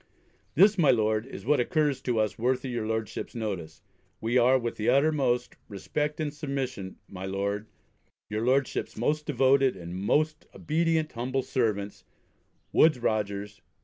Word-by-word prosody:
This, 195 Hz, +5 st, +5 dB
my 150 Hz, -5 st, +5 dB
Lord, 110 Hz, -1 st, +2 dB
is -, -, -9 dB
what 150 Hz, -, +3 dB
occurs 145 Hz, 0 st, +1 dB
to 120 Hz, -3 st, 0 dB
us 110 Hz, 0 st, -1 dB
worthy 130 Hz, +2 st, 0 dB
your 120 Hz, -3 st, -2 dB
Lordship's 110 Hz, 0 st, -3 dB
notice. 95 Hz, -9 st, -5 dB, 0.4 s
We 115 Hz, +2 st, -1 dB
are, 125 Hz, +1 st, +5 dB
with 120 Hz, -2 st, -3 dB
the 110 Hz, -, 0 dB
uttermost 135 Hz, -3 st, +2 dB
respect 150 Hz, +9 st, -3 dB
and 150 Hz, -2 st, -2 dB
submission 135 Hz, -10 st, -4 dB
My 95 Hz, 0 st, -7 dB
Lord, 100 Hz, +2 st, -2 dB, 0.6 s
Your 110 Hz, +1 st, -2 dB
Lordship's 130 Hz, +2 st, 0 dB
most 150 Hz, +6 st, 0 dB
devoted 135 Hz, -1 st, +3 dB
and 85 Hz, 0 st, -7 dB
most 155 Hz, +11 st, 0 dB
obedient 160 Hz, 0 st, 0 dB
humble 130 Hz, +3 st, -2 dB
servants, 105 Hz, -6 st, -1 dB, 0.7 s
WOODES 155 Hz, -3 st, +5 dB
ROGERS. 105 Hz, -3 st, -2 dB
125 Hz, 145 wpm, -28 LUFS, 105-140 Hz, 0.7 s, This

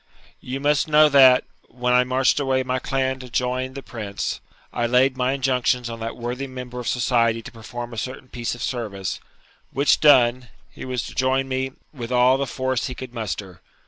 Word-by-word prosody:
You 130 Hz, +2 st, -5 dB
must 145 Hz, +1 st, +2 dB
know 155 Hz, 0 st, +6 dB
that, 130 Hz, -3 st, +7 dB, 0.2 s
when 125 Hz, 0 st, -1 dB
I 125 Hz, 0 st, +5 dB
marched 130 Hz, +2 st, +2 dB
away 135 Hz, -2 st, +1 dB
my 130 Hz, 0 st, -1 dB
clan 130 Hz, 0 st, -1 dB
to 125 Hz, -1 st, -10 dB
join 125 Hz, +2 st, -2 dB
the 135 Hz, -, -7 dB
Prince, 105 Hz, -4 st, -5 dB, 0.3 s
I 120 Hz, -1 st, 0 dB
laid 125 Hz, +2 st, +3 dB
my 130 Hz, +1 st, 0 dB
injunctions 125 Hz, -2 st, 0 dB
on 115 Hz, -, -7 dB
that 115 Hz, +1 st, -5 dB
worthy 125 Hz, +3 st, -4 dB
member 125 Hz, -1 st, -7 dB
of 120 Hz, -, -6 dB
society 115 Hz, -2 st, +1 dB
to -, -, -9 dB
perform 120 Hz, +1 st, -8 dB
a 115 Hz, -, -3 dB
certain 130 Hz, +2 st, -6 dB
piece 120 Hz, -1 st, -3 dB
of 120 Hz, -, -7 dB
service, 105 Hz, -7 st, -3 dB, 0.5 s
which 140 Hz, +2 st, +2 dB
done, 125 Hz, -4 st, +5 dB, 0.2 s
he -, -, -9 dB
was 125 Hz, -2 st, -3 dB
to -, -, -9 dB
join 130 Hz, +1 st, +1 dB
me 130 Hz, 0 st, -2 dB, 0.2 s
with 120 Hz, -4 st, -7 dB
all 125 Hz, +1 st, +4 dB
the 140 Hz, -, -1 dB
force 130 Hz, +1 st, -2 dB
he 130 Hz, -, -6 dB
could 130 Hz, -1 st, -8 dB
muster. 100 Hz, -5 st, -5 dB
125 Hz, 195 wpm, -23 LUFS, 120-130 Hz, 0.5 s, that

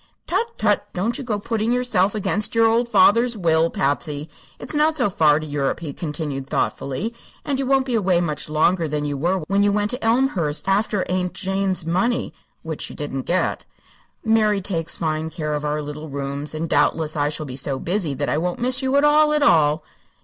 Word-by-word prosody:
"Tut 465 Hz, 0 st, -2 dB
tut! -, -, +1 dB
don't 215 Hz, +7 st, -1 dB
you -, -, -4 dB
go 225 Hz, -4 st, -1 dB
putting 220 Hz, +2 st, -1 dB
yourself 240 Hz, -6 st, +1 dB
against 210 Hz, +1 st, 0 dB
your 230 Hz, 0 st, +5 dB
old 235 Hz, +2 st, +2 dB
father's 230 Hz, +3 st, +4 dB
will, 165 Hz, -3 st, +2 dB
Patsy. 145 Hz, +1 st, -2 dB, 0.3 s
It's -, -, -7 dB
not 310 Hz, +1 st, +2 dB
so 245 Hz, -7 st, +1 dB
far 155 Hz, -5 st, +4 dB
to 155 Hz, -, -6 dB
Europe," 145 Hz, -2 st, -1 dB
he 150 Hz, -4 st, -5 dB
continued, 145 Hz, -4 st, -4 dB
thoughtfully, 190 Hz, -, -2 dB, 0.3 s
"and 275 Hz, -2 st, -1 dB
you 270 Hz, -, -1 dB
won't 270 Hz, -1 st, +3 dB
be 255 Hz, -, -3 dB
away 190 Hz, -6 st, +2 dB
much 155 Hz, -4 st, -2 dB
longer 165 Hz, +2 st, +2 dB
than 150 Hz, 0 st, -2 dB
you 145 Hz, -1 st, -2 dB
were 175 Hz, +6 st, 0 dB
when 195 Hz, +4 st, +1 dB
you 205 Hz, 0 st, +3 dB
went 205 Hz, +1 st, 0 dB
to 250 Hz, -, -5 dB
Elmhurst 225 Hz, -, +1 dB
after 200 Hz, 0 st, +1 dB
Aunt 180 Hz, 0 st, -1 dB
Jane's 195 Hz, -2 st, -1 dB
money 190 Hz, +9 st, 0 dB, 0.3 s
which 160 Hz, -2 st, -5 dB
you -, -, -9 dB
didn't 135 Hz, -3 st, -5 dB
get. 185 Hz, +1 st, 0 dB, 0.6 s
Mary 215 Hz, -2 st, +3 dB
takes 170 Hz, -4 st, -3 dB
fine 160 Hz, -1 st, -2 dB
care 155 Hz, -2 st, -3 dB
of 150 Hz, 0 st, -2 dB
our 150 Hz, 0 st, -1 dB
little 150 Hz, +1 st, -7 dB
rooms, 140 Hz, +2 st, -4 dB
and 160 Hz, +2 st, -2 dB
doubtless 155 Hz, +1 st, +1 dB
I 145 Hz, -1 st, +1 dB
shall 155 Hz, 0 st, -4 dB
be 130 Hz, -3 st, -7 dB
so 135 Hz, 0 st, -3 dB
busy 170 Hz, -1 st, -2 dB
that 145 Hz, +2 st, -2 dB
I 150 Hz, -, +1 dB
won't 175 Hz, +1 st, -2 dB
miss 255 Hz, +2 st, +1 dB
you 265 Hz, +1 st, 0 dB
at 280 Hz, -, +4 dB
all, 300 Hz, +1 st, +5 dB
at 300 Hz, -1 st, +2 dB
all." 155 Hz, -, +4 dB
180 Hz, 205 wpm, -22 LUFS, 150-225 Hz, 0.6 s, your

